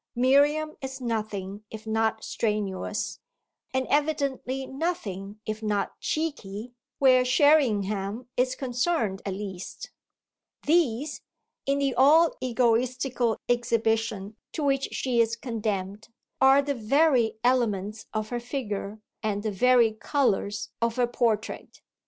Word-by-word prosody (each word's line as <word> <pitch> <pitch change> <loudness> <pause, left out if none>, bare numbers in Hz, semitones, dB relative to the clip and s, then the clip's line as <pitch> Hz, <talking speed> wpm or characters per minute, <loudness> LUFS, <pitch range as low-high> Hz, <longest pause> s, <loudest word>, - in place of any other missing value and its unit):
Miriam 290 +5 +3
is 265 0 -6
nothing 215 -4 -3
if 220 0 -9
not 220 0 0
strenuous, 210 -1 -2 0.5
and 260 0 0
evidently 280 -3 0
nothing 220 - -4
if 215 0 -4
not 210 -2 -2
"cheeky," 245 -8 -3 0.2
where 255 -2 +5
Sherringham 235 -6 +2
is 255 +1 +1
concerned 250 - -1
at 190 - -2
least: 190 -2 -7 0.7
these, 295 -4 +1 0.5
in 275 0 +2
the 275 -2 +1
all 305 +6 +5
egotistical 245 0 +1
exhibition 225 -3 0 0.2
to 310 - -3
which 275 -1 +1
she 245 -3 +1
is 230 0 +1
condemned, 215 -4 -3 0.3
are 270 +1 +6
the 285 0 -1
very 250 -1 +2
elements 215 -4 0
of 215 0 -3
her 240 - -2
figure 220 -5 -4 0.2
and 205 -2 -2
the 215 - -1
very 240 +2 +4
colours 215 -4 0
of 230 0 +1
her 250 -1 +3
portrait. 230 -3 -2
235 Hz, 115 wpm, -27 LUFS, 215-270 Hz, 0.7 s, are